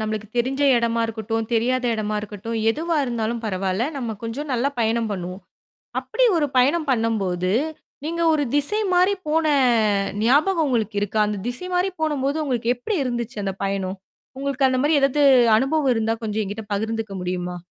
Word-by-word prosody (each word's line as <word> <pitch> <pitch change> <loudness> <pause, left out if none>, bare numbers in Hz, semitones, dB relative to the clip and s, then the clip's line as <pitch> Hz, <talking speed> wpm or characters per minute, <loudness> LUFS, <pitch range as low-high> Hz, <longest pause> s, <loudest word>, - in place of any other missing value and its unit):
நம்மளுக்கு 215 -1 -3
தெரிஞ்ச 260 +4 0 0.2
இடமா 235 0 +1
இருக்கட்டும், 225 0 -3
தெரியாத 250 +3 +1
இடமா 215 -1 -2
இருக்கட்டும், 215 +2 -6
எதுவா 325 +5 -1
இருந்தாலும் 235 -1 -2
பரவால்ல, 190 +1 -1
நம்ம 235 -5 -3
கொஞ்சம், 275 +6 -4
நல்லா 255 +2 +1
பயணம் 225 0 +1
பண்ணுவோம். 185 0 -6 0.6
அப்படி - - 0
ஒரு 300 -3 +2
பயணம் 295 +6 +3
பண்ணும்போது, 195 -7 0 0.5
நீங்க 335 +2 -2
ஒரு 295 -2 +1
திசை 290 +10 +1
மாரி 365 +3 +4
போன 320 +1 +2 0.8
ஞாபகம் 310 - +3
உங்களுக்கு 220 -5 -1
இருக்கா? 205 +1 0
அந்த 210 -1 -3
திசை 245 +9 -5
மாரி 360 +2 +2
போனம்போது 295 -1 0
உங்களுக்கு 245 -2 0
எப்படி 390 - -3
இருந்துச்சு, 240 -3 -3
அந்த 195 - -2
பயணம்? 195 -1 -2 0.4
உங்களுக்கு 275 -1 +1
அந்த 255 0 0
மாரி 295 +1 +3
ஏதாவது 275 +2 +2 0.4
அனுபவம் 270 0 +1
இருந்தா 225 0 0
கொஞ்சம் 215 0 -1
எங்கிட்ட 205 +3 -6
பகிர்ந்துக்க 220 0 -3
முடியுமா? 180 0 -3
235 Hz, 155 wpm, -22 LUFS, 215-280 Hz, 0.8 s, மாரி